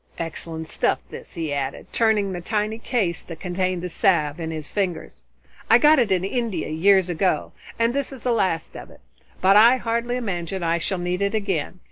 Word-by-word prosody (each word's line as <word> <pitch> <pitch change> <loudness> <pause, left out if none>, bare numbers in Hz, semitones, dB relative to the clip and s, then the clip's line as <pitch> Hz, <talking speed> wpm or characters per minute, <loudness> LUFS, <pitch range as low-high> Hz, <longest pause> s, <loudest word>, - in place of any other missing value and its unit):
Excellent 160 -1 -5
stuff, - - 0
this," - - -10
he 160 -3 -3
added, 140 -1 -3
turning 215 -4 +2
the 175 -1 -5
tiny 215 +3 -2
case 215 -8 -1
that 165 -2 -10
contained 185 -1 -2
the - - -2
salve 165 -3 +1
in 160 -1 -4
his 155 -2 -6
fingers. 180 - -3 0.5
"I 225 - +8
got 300 +3 +5
it 230 -5 +2
in 185 -1 +2
India 230 -3 -2
years 185 +4 +4
ago, 180 +2 0 0.3
and 230 +1 +2
this 280 0 -2
is 265 -3 -10
the 250 - +1
last 185 -8 0
of - - -9
it. - - -17 0.4
But 195 +2 +6
I 235 +4 +7
hardly 235 0 -1
imagine 190 -6 -3
I 170 0 +1
shall 190 +3 -2
need 180 +1 -2
it 200 +2 0
again. 190 -5 -2
190 Hz, 195 wpm, -23 LUFS, 170-220 Hz, 0.5 s, I